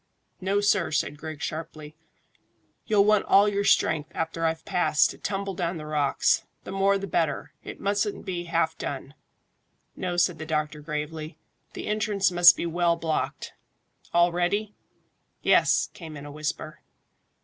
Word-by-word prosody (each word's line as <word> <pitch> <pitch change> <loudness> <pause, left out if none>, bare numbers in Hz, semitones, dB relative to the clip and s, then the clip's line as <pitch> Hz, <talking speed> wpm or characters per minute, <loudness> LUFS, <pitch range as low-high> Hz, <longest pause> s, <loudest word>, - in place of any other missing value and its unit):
"No, 195 +2 0
sir," 205 -3 +2
said 150 -1 -1
Griggs 155 -1 -7
sharply. 155 -1 -6 0.9
"You'll 205 -2 +4
want 210 -1 +4
all 200 +1 +5
your 200 -1 0
strength 155 -5 +2
after 165 0 -2
I've 160 0 -1
passed, 180 -6 +2
to - - -13
tumble 195 -1 -3
down 175 -1 -2
the 155 - -7
rocks. 150 -2 +1 0.2
The - - -8
more 195 +1 +2
the 195 - -5
better. 165 -5 -1
It - - -8
mustn't 205 +1 -1
be 175 -2 -4
half 165 -1 0
done." 140 0 -5 0.8
"No," 180 -1 -3
said 175 -2 +2
the 160 - -5
doctor 150 -1 -2
gravely. 155 +1 -5 0.4
"The - - -6
entrance 210 -2 +1
must 175 0 +7
be - - -2
well 170 0 +1
blocked. 165 -2 -3 0.6
All 175 0 +4
ready?" 200 +5 -1 0.7
"Yes," - - +3
came 160 -3 -9
in 140 - -9
a 145 - -8
whisper. 155 +1 -5
170 Hz, 155 wpm, -26 LUFS, 155-195 Hz, 0.9 s, must